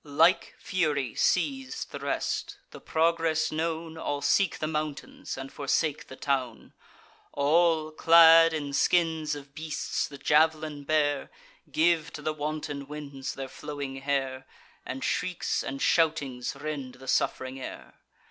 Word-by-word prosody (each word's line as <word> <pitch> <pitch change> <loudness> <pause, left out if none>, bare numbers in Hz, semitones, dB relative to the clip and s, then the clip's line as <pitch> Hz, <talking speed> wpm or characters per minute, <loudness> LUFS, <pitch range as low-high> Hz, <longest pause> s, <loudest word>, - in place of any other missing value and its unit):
Like 160 +5 +3
fury 150 - -1
seiz'd 265 +8 0
the - - -6
rest; - - -2
the - - -11
progress 165 -1 +1
known, 160 0 -3
All 145 -2 -3
seek 195 -4 +2
the - - -2
mountains, 150 -3 -4
and 135 0 -7
forsake 145 +1 -1
the 130 - -10
town: 130 -4 -2 0.6
All, 155 +2 +3
clad 165 +1 +7
in 145 -3 -3
skins 160 -1 +2
of 140 -1 -11
beasts, 155 0 -3
the 140 - -10
jav'lin 150 0 +2
bear, 145 -2 +1 0.4
Give 160 -1 +2
to 150 - -8
the 155 - -1
wanton 150 -2 -4
winds 145 -3 -6
their 135 0 -5
flowing 140 0 -6
hair, 135 -1 -2 0.4
And 130 +1 -5
shrieks 180 -1 -1
and 135 0 -5
shoutings 140 -8 +1
rend 140 -3 -5
the 130 - -13
suff'ring 130 +1 0
air. - - -8
150 Hz, 135 wpm, -28 LUFS, 140-160 Hz, 0.6 s, clad